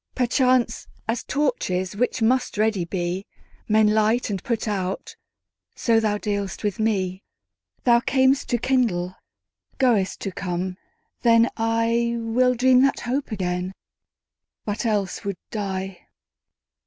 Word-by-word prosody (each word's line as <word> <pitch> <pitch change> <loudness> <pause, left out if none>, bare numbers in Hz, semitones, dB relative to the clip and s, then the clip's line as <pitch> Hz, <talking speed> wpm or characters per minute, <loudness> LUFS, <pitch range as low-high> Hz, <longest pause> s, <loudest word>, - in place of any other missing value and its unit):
Perchance, 250 -1 +2 0.2
as 230 +1 -1
torches, 205 -10 -1
which 245 +1 0
must 250 0 +1
ready 210 -4 +1
be, 180 +2 -3 0.4
Men 215 0 +4
light 220 +2 +2
and 195 - -3
put 235 -4 -2
out, 190 -3 -3 0.6
so 230 -2 +3
thou 215 -2 +1
dealst 200 -3 -3
with 210 +1 -1
me. 190 -4 0 0.6
Thou 235 -1 +5
cam'st 265 +2 +2
to 240 - +2
kindle, 215 -9 0 0.6
goest 225 -8 +2
to 195 - -3
come: 180 0 -3 0.4
then 230 0 +5
IWill 230 +2 +1
dream 255 +1 +5
that 275 0 +2
hope 260 +2 -2
again, 180 -2 -2 0.9
but 210 +2 -2
else 205 -3 -1
would 200 -2 -3
die. 195 -3 -4
220 Hz, 120 wpm, -23 LUFS, 190-240 Hz, 0.9 s, Thou